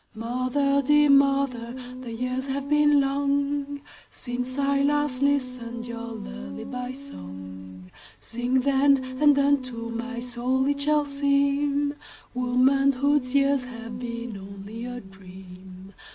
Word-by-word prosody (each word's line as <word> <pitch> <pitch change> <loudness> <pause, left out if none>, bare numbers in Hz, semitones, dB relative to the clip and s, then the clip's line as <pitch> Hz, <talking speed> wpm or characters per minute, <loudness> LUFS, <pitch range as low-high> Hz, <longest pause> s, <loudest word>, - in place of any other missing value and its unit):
Mother, 255 +5 +1
dear 295 +1 +5
mother, 275 -4 +2 0.3
the 245 -2 -7
years 255 +3 -3
have 275 +1 -3
been 295 0 +4
longSince 280 -2 -2
I 280 0 +2
last 290 -2 +1
listened 250 -4 -1
your 235 -1 -6
lullaby 95 - -6
song:Sing, 95 - -5
then, 270 -1 +2
and 290 -1 +6
unto 255 -5 +1
my 235 +1 -4
soul 250 +2 -1
it 285 0 0
shall 300 0 +2
seemWomanhood's 280 -1 +1
years 275 -2 +3
have 235 -1 -8
been 235 -3 -5
only 200 +4 -8
a 245 0 -6
dream. 190 0 -13
255 Hz, 105 wpm, -25 LUFS, 235-280 Hz, 0.3 s, and